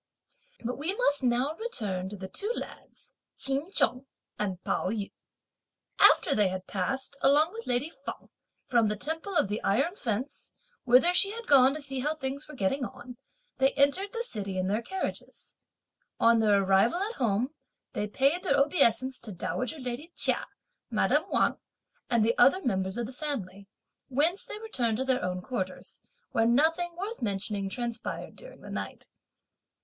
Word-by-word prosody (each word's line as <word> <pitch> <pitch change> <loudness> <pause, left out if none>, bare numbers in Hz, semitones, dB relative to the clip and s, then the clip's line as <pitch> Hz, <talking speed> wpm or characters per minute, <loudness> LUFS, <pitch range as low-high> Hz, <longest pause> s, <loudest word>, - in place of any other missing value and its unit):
But 250 +3 -3
we 340 +7 -1
must 290 - +2
now 250 +4 +2
return 205 - -2
to 205 - -7
the 190 0 -6
two 410 - -3
lads, - - -9 0.2
Ch'in 275 +6 0
Chung 255 -7 +2 0.3
and 190 -4 -2
Pao - - 0
yü. 205 -1 -3 0.9
After - - +6
they 210 -2 +3
had 185 0 -4
passed, 265 +10 -2
along 300 +6 +4
with 460 +1 -8
lady 250 +6 +1
Feng - - -9 0.4
from 235 -3 +3
the 210 - 0
Temple 325 - -3
of 205 - +3
the 210 +2 -3
Iron 275 - +1
Fence, 250 - -4 0.3
whither 255 +8 +6
she 395 +2 +5
had 465 +1 -7
gone 270 -1 +6
to 310 - -5
see 270 -1 -2
how 300 +4 0
things 280 0 -5
were 300 - -10
getting 260 +5 0
on, 250 0 -8 0.4
they 270 +1 +4
entered 290 +9 +2
the 465 0 -3
city 200 - -4
in 185 - 0
their 210 +3 0
carriages. 380 +10 -6 0.6
On 230 0 +5
their 205 -3 +4
arrival 195 - +3
at 440 +3 -4
home, 240 +3 0 0.4
they 210 - -2
paid 275 - +2
their 375 - +2
obeisance 260 -3 +3
to 220 - -7
dowager 250 - -3
lady 255 +5 -5
Chia, - - +2 0.4
madame - - +2
Wang - - +2 0.5
and 230 -3 +3
the 230 - +2
other 275 +10 +5
members 190 -3 -1
of 240 - -1
the 250 - -8
family, 200 -10 -5 0.4
whence 310 +9 +1
they - - -7
returned 250 - -1
to 265 - -1
their 260 -5 +1
own 180 0 -2
quarters, 190 -7 -4 0.3
where 225 -3 +2
nothing 325 +7 +2
worth 415 +5 -5
mentioning 200 -2 -2
transpired 235 +2 -4
during - - -13
the - - -10
night. - - -5
255 Hz, 170 wpm, -29 LUFS, 210-305 Hz, 0.9 s, After